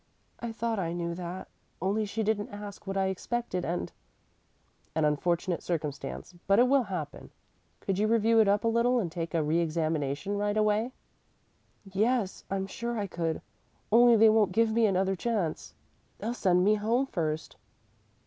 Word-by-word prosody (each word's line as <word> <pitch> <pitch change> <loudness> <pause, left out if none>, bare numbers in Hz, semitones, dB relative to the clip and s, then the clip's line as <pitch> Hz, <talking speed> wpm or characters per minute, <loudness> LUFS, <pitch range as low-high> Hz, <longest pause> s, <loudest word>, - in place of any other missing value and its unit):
"I 235 -1 -4
thought 225 -1 -2
I 170 -2 -2
knew 170 -1 -2
that, 175 +1 -6 0.3
only 200 +4 0
she 220 +2 -2
didn't 210 -1 0
ask 205 -1 -9
what 195 0 -2
I 195 - +2
expected 190 0 -2
and 175 +1 -2 0.5
" - - -40
"An 160 -1 +2
unfortunate 170 +4 0
circumstance, 155 +1 -4
but 195 +1 +5
it 245 +2 +6
will 275 +1 +4
happen. 175 -7 -6 0.5
Could 195 0 -1
you 215 - +3
review 225 0 +4
it 220 - +5
up 205 +2 +2
a - - +1
little 235 +2 +3
and 180 -7 -2
take 170 -1 -4
a 160 - +2
reëxamination 160 +2 0
right 205 +1 0
away?" 215 +3 +2 0.9
"Yes; 205 +2 0
I'm 195 0 -1
sure 235 +4 -4
I 205 - -1
could, 165 -4 -3 0.5
only 240 +1 +7
they 220 0 +7
won't 215 -4 +3
give 225 +2 +3
me 230 -1 +4
another 190 0 +1
chance. 200 -5 -2 0.4
They'll 230 +3 -3
send 180 -6 +2
me 210 +3 +5
home 225 +5 +1
first." 160 -9 -3
200 Hz, 170 wpm, -29 LUFS, 175-225 Hz, 0.9 s, only